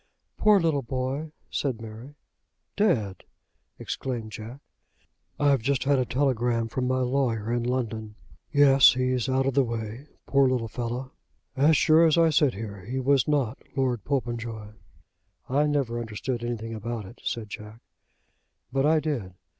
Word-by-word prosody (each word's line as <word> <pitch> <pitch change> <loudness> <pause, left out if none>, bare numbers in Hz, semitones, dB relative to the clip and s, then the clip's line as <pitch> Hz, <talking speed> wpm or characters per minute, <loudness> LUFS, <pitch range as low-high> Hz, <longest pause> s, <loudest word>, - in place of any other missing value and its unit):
"Poor 210 -2 +5
little 160 -5 +1
boy!" 130 +4 -3 0.2
said 130 -5 -1
Mary. 115 +5 -10 0.6
"Dead!" 120 - +1 0.5
exclaimed 120 -5 -4
Jack. 110 +5 -8 0.8
"I've 140 -3 +3
just 135 +2 0
had 140 -1 +3
a 130 - +1
telegram 120 -3 0
from 125 +2 -2
my 130 0 +1
lawyer 125 -4 0
in 120 - 0
London. 115 -3 -3 0.4
Yes; 140 -2 +7
he's 130 -1 0
out 130 0 +2
of 135 - +1
the 140 +1 +4
way. 115 +3 -5 0.2
Poor 135 -1 +3
little 125 -3 0
fellow! 125 +3 -4 0.4
As 145 +3 +4
sure 165 +1 +5
as 160 - +3
I 165 -1 +5
sit 145 -5 +3
here 100 -2 -7
he 130 +4 -3
was 135 +1 +2
not 140 -5 0 0.2
Lord 125 -5 0
Popenjoy." 120 -5 -3 0.8
"I 145 +3 +2
never 135 -5 0
understood 120 +2 -4
anything 115 -1 -4
about 110 0 -5
it," 115 +6 -13
said 110 -3 -3
Jack. 105 +2 -9 0.9
"But 135 +1 +2
I 155 0 +4
did. 120 - -3
125 Hz, 150 wpm, -26 LUFS, 115-140 Hz, 0.9 s, Yes